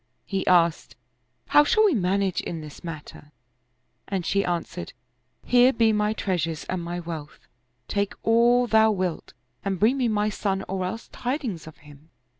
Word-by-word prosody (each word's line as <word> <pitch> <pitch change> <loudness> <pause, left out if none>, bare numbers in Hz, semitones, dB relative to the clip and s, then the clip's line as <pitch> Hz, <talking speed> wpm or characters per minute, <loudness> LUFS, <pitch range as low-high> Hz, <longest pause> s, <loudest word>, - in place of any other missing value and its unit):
He 195 -2 -3
asked, 170 -2 +3 0.3
" - - -47
How 295 - +7
shall 435 +8 +3
we 400 - +4
manage 195 -3 0
in 165 -2 -5
this 150 +2 -11
matter? 155 -2 -9 0.4
" 125 +1 -47
and 190 -3 -2
she 200 0 +1
answered, 175 0 -4 0.3
" 125 +1 -48
Here 245 +1 +5
be 225 -3 +3
my 210 0 +1
treasures 165 -7 -2
and 185 -1 -3
my 175 +1 -4
wealth: 160 -3 -8 0.4
take 200 -1 -1
all 235 +2 +4
thou 220 -1 +4
wilt 185 -5 -2 0.3
and 195 -2 -2
bring 235 +6 +3
me 255 -3 +1
my 210 -1 +1
son 195 -2 -2
or 190 -1 -2
else 225 +5 -5
tidings 245 - -4
of 155 -2 -12
him." 145 +2 -16
195 Hz, 175 wpm, -25 LUFS, 170-220 Hz, 0.4 s, How